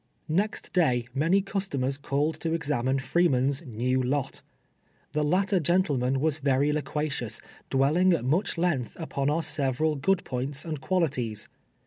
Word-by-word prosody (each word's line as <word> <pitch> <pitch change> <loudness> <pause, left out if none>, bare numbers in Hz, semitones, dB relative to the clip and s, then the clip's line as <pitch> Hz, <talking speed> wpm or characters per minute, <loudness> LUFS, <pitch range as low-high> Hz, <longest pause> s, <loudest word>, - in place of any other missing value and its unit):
Next 205 +5 -1
day 125 -10 +2
many 165 +8 +2
customers 145 -10 -2
called 145 +3 0
to 165 -1 -1
examine 135 -4 0
Free 170 +6 +2
man's 135 0 +1
" - - -15 0.2
new 130 +1 +2
lot." 130 +2 -2 0.7
The 150 0 0
latter 185 +5 +2
gentleman 145 -7 +1
was 155 +1 +1
very 140 +1 +2
loquacious, 145 -7 -2 0.3
dwelling 150 +8 +3
at 155 -8 -1
much 175 +8 +1
length 155 -10 -1
upon 140 -4 -1
our 160 +3 0
several 150 0 +1
good 185 +7 +1
points 135 +4 -3
and 155 -4 -4
qualities. 130 - -1
145 Hz, 145 wpm, -27 LUFS, 135-170 Hz, 0.7 s, dwelling